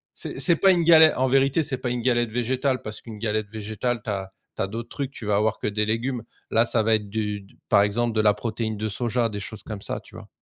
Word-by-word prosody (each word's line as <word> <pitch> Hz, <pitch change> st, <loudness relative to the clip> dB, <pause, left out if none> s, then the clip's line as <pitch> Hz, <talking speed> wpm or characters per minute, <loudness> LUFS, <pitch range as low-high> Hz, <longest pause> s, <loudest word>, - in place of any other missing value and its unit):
c'est -, -, -7 dB
c'est 170 Hz, -, +3 dB
pas 195 Hz, +4 st, +5 dB
une 175 Hz, -2 st, +2 dB
gale 160 Hz, -1 st, +8 dB
en 130 Hz, -, +2 dB
vérité, 135 Hz, +4 st, +3 dB
c'est 140 Hz, -3 st, -3 dB
pas 125 Hz, -1 st, -3 dB
une 120 Hz, -1 st, -2 dB
galette 120 Hz, -2 st, +1 dB
végétale 130 Hz, +2 st, 0 dB
parce 110 Hz, -1 st, -7 dB
qu'une 110 Hz, -3 st, -9 dB
galette 110 Hz, -1 st, -1 dB
végétale 110 Hz, +2 st, -3 dB
tu -, -, -5 dB
as 95 Hz, -1 st, -3 dB, 0.2 s
tu -, -, -3 dB
as 95 Hz, -, -1 dB
d'autres 115 Hz, +3 st, -6 dB
trucs, 140 Hz, -2 st, -4 dB
tu 120 Hz, -, -9 dB
vas 105 Hz, -1 st, +1 dB
avoir 110 Hz, +2 st, +1 dB
que -, -, -2 dB
des 105 Hz, 0 st, 0 dB
légumes. 115 Hz, +2 st, -1 dB, 0.3 s
Là 115 Hz, +1 st, +3 dB
ça 115 Hz, -1 st, +1 dB
va 110 Hz, 0 st, +4 dB
être 105 Hz, -1 st, -3 dB
du 105 Hz, -1 st, -2 dB
d 100 Hz, -, -19 dB, 0.2 s
par 100 Hz, -, +6 dB
exemple, 115 Hz, +3 st, 0 dB
de 110 Hz, -, +3 dB
la 105 Hz, -1 st, +5 dB
protéine 110 Hz, 0 st, -3 dB
de 110 Hz, +1 st, -2 dB
soja, 120 Hz, +2 st, 0 dB
des 105 Hz, -, -5 dB
choses 110 Hz, +1 st, -7 dB
comme 105 Hz, -3 st, -7 dB
ça, -, -, -3 dB
tu -, -, -17 dB
vois? -, -, -10 dB
115 Hz, 270 wpm, -24 LUFS, 105-125 Hz, 0.3 s, gale